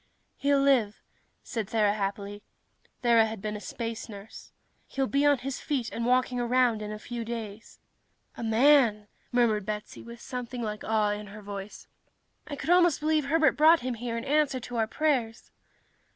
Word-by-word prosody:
"He'll 280 0 +2
live," 240 -7 +2 0.4
said 225 -4 -4
Thera 215 -2 +2
happily. 200 0 -4 0.6
Thera 230 -2 +5
had 220 -1 -6
been 210 +2 -4
a 210 - -7
space 230 +3 -5
nurse. 205 +1 -11 0.4
"He'll 270 -1 -1
be 280 +2 +2
on 290 -1 +4
his 260 +1 -5
feet 270 -6 -2
and 230 +1 -3
walking 250 0 +2
around 240 -2 +2
in 210 0 -5
a 215 - -5
few 235 +2 -6
weeks." 225 -2 -7 0.6
"A - - -8
man!" 225 -2 +4 0.2
murmured 230 -4 +2
Betsy, 210 +1 -6
with 235 0 -11
something 250 0 -6
like 210 -1 -4
awe 215 -1 +1
in 210 0 -5
her 210 +1 -11
voice. 200 0 -8 0.6
"I 290 - -5
could 310 - -2
almost 350 -3 +4
believe 305 -1 +1
Herbert 310 0 +3
brought 320 +2 +6
him 255 0 -2
here 230 0 -4
in 230 - -5
answer 290 -2 +1
to 245 0 -6
our 220 -1 +1
prayers." 245 -5 -1
235 Hz, 175 wpm, -28 LUFS, 215-270 Hz, 0.6 s, brought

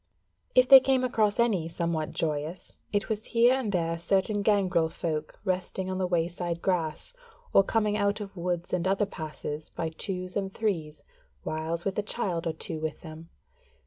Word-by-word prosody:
If 255 0 +6
they 270 0 +11
came 260 0 +2
across 220 -4 +1
any 205 -9 +2
somewhat 165 -2 -2
joyous, 155 +3 -3 0.2
it 205 0 0
was 215 -1 -2
here 240 +2 +7
and 260 -6 -1
there 165 -2 0
certain 195 +4 +1
gangrel 190 -6 +2
folk 155 -2 -4
resting 185 0 -2
on 185 - -2
the 185 - +1
wayside 175 0 -1
grass, 170 - -1 0.4
or 195 - +7
coming 210 0 +1
out 205 +1 +1
of 200 -2 -7
woods 175 -1 -3
and 180 0 +1
other 195 +2 +2
passes 155 -4 -6
by 165 - -3
twos 185 +2 -5
and 195 -1 -1
threes, 165 -9 -2 0.4
whiles 160 +2 -3
with 195 +1 -1
a - - +3
child 190 -6 -2
or 165 - 0
two 160 -2 -5
with 155 -1 -4
them. 160 0 -10
185 Hz, 175 wpm, -28 LUFS, 165-205 Hz, 0.4 s, they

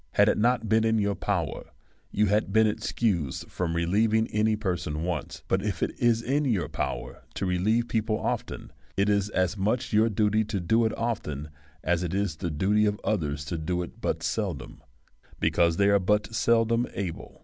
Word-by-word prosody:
Had 105 +1 +5
it - - +2
not 120 0 +2
been 110 +1 +3
in 110 0 +2
your 100 -1 +1
power - - -2 0.4
you 105 - +2
had 105 0 +1
been 110 +2 +5
excused 105 - -1
from 85 -2 -2
relieving 110 +6 +2
any 110 0 +2
person 90 -7 -2
once; 85 -4 -4
but - - +1
if - - -2
it - - 0
is 115 -1 +3
in 140 +5 +1
your 105 - 0
power - - -4
to - - -2
relieve 105 +6 +1
people 110 -1 0
often, - - -4 0.2
it 100 +1 +2
is 100 0 +2
as 95 -2 0
much 110 +5 -1
your 110 +2 +4
duty 105 +1 +2
to 105 -2 -3
do 110 +7 +2
it 110 - -1
often, 75 -11 -3 0.3
as 90 +1 +1
it 90 0 -2
is 100 -6 -1
the 85 - -3
duty 100 +7 +2
of 105 0 -1
others 75 -8 -1
to 85 +1 -3
do 90 +3 -1
it 85 - -11
but - - -1
seldom, - - -3 0.6
because 85 -1 +2
they 100 - +4
are 100 0 +5
but 105 +4 +1
seldom 115 +1 +2
able. 95 -4 -5
105 Hz, 190 wpm, -27 LUFS, 90-110 Hz, 0.6 s, Had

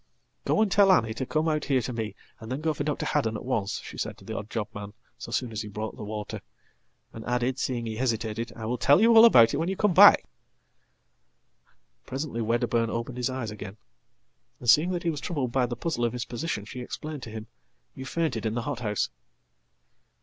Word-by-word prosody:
"Go 215 - +3
and 205 - -1
tell 195 -1 +6
Annie 110 -11 +3
to 125 +3 -4
come 155 +1 0
out 155 -2 0
here 130 -4 +1
to 125 - -4
me, 110 -3 -4 0.2
and 110 +2 -9
then 135 +3 -3
go 160 0 +1
for 145 - -3
Dr. 150 0 -2
Haddon 115 -7 0
atonce," 110 -6 -2
she - - -9
said - - -3
to - - -16
the - - -5
odd 105 - -5
job 110 -3 -3
man 100 0 -7 0.3
so - - -8
soon 125 -3 -1
as 110 -1 -3
he 105 - -6
brought 110 +2 -5
the - - -8
water; 105 0 -5 0.7
andadded, 125 +3 -2
seeing 120 -4 -2
he 110 -1 -4
hesitated, 115 -2 -2
"I 110 - -6
will 120 +2 -2
tell 140 +6 +5
you 230 +2 +5
all 225 +1 +10
about 115 - +7
it - - 0
when 165 +4 -1
you 190 - -1
comeback."Presently 115 - 0
Wedderburn 115 0 +1
opened 115 +2 -4
his 125 +1 0
eyes 130 -4 -4
again, 105 -1 -8 0.8
and, 120 - -9
seeing 150 +9 +6
that 175 -2 -2
he 170 - +1
wastroubled 145 -4 -3
by 125 0 +2
the 120 - -4
puzzle 155 -6 -2
of 120 -1 +1
his 125 -1 -3
position, 120 -4 -4
she 125 +4 -8
explained 150 +4 -6
to 115 - -8
him, 110 0 -7 0.5
"You 130 - -8
faintedin 115 -9 -1
the 120 - -2
hothouse."" 115 - -2
120 Hz, 205 wpm, -27 LUFS, 110-145 Hz, 0.8 s, all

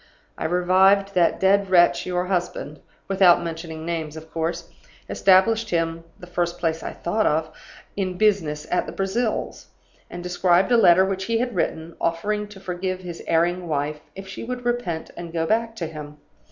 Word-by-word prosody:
I - - -5
revived 190 +3 +3
that 175 -3 +2
dead 195 0 +3
wretch, 175 -1 +4
your 180 0 -1
husband 175 -5 -3 0.3
(without 190 -3 +5
mentioning 160 -1 -6
names, 160 -2 -4
of 160 0 -11
course), 165 +1 -3 0.4
established 210 +4 +3
him 165 -1 -1 0.2
(the - - -10
first 175 -1 -2
place 165 -2 -1
I - - -5
thought 215 +6 -1
of) 155 +1 0 0.4
in 185 -2 -2
business 175 -8 +1
at 180 - +1
the - - -6
Brazils, 215 +4 -2 0.4
and 175 0 -7
described 180 +2 +2
a - - +6
letter 190 -5 +6
which 190 0 -3
he 230 +2 0
had 245 +1 -1
written, 165 -2 -2
offering 205 +6 -1
to 205 -1 -13
forgive 185 0 -4
his 175 -2 -8
erring 175 +2 +1
wife, 150 0 -2 0.2
if 195 0 -9
she 195 - -7
would 245 +1 -5
repent 240 -10 -2
and 170 -1 -7
go 165 -1 -1
back 225 +4 0
to 175 - -4
him. 150 -2 -8
180 Hz, 175 wpm, -23 LUFS, 165-195 Hz, 0.4 s, a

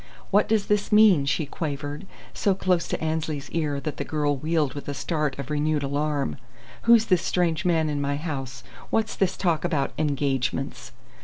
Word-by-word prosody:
"What 205 +1 +3
does 215 -2 +2
this 210 -1 0
mean?" 205 -10 +6
she 145 +2 +1
quavered, 145 +3 -5 0.3
so 195 -2 +1
close 185 -2 +1
to - - -2
Annesley's 155 -3 -2
ear 150 -4 -1
that 150 +2 -4
the - - -2
girl 145 -2 0
wheeled 150 -1 0
with 145 - -7
a 145 - -3
start 150 -1 -1
of 140 +1 -6
renewed 150 0 0
alarm. 145 0 -1 0.5
"Who's 230 -1 +6
this 180 -3 +3
strange 175 0 0
man 165 -3 +2
in 145 -1 -1
my 140 0 0
house? 135 -5 -5 0.3
What's 220 0 0
this 190 -2 0
talk 170 -4 +1
about 150 -6 0
'engagements'?" 135 -2 -1
155 Hz, 175 wpm, -25 LUFS, 140-175 Hz, 0.5 s, mean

